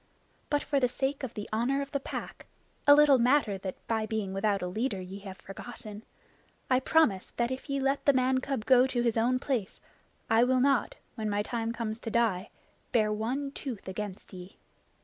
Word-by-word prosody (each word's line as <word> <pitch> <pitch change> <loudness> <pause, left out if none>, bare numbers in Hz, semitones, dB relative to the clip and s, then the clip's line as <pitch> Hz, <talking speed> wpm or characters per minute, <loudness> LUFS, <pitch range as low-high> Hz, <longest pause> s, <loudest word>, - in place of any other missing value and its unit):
But 290 -1 +1
for 280 - +1
the 250 - +3
sake 270 +3 -2
of 260 -4 -5
the 210 -2 -5
Honor 245 +5 +1
of 275 - -11
the 280 - -1
Pack, - - -7 0.4
a 285 - +10
little 290 -3 +6
matter 235 -5 +3
that 190 -1 -5
by 220 -1 0
being 215 -4 -2
without 195 0 0
a - - -1
leader 215 +2 -2
ye 185 +2 -7
have 195 -1 -9
forgotten, 210 +1 -9 0.7
I 255 - +5
promise 260 -9 +2
that 235 +1 +1
if 260 +3 -6
ye 275 0 0
let 275 +1 0
the 285 - +7
man 260 0 +2
cub 260 -4 -3
go 255 0 +6
to 245 -2 -1
his 235 -2 +1
own 240 +3 +2
place, 255 -7 -2 0.5
I 225 +1 +4
will 255 +1 +3
not, 275 -1 +2 0.2
when 215 -1 -3
my 205 0 0
time 230 0 -2
comes 230 -1 -4
to 230 - -5
die, 220 -4 +1 0.4
bare 215 -2 +2
one 255 +6 -2
tooth 255 -8 -7
against 195 +1 -6
ye. 180 +1 -10
235 Hz, 200 wpm, -29 LUFS, 210-265 Hz, 0.7 s, a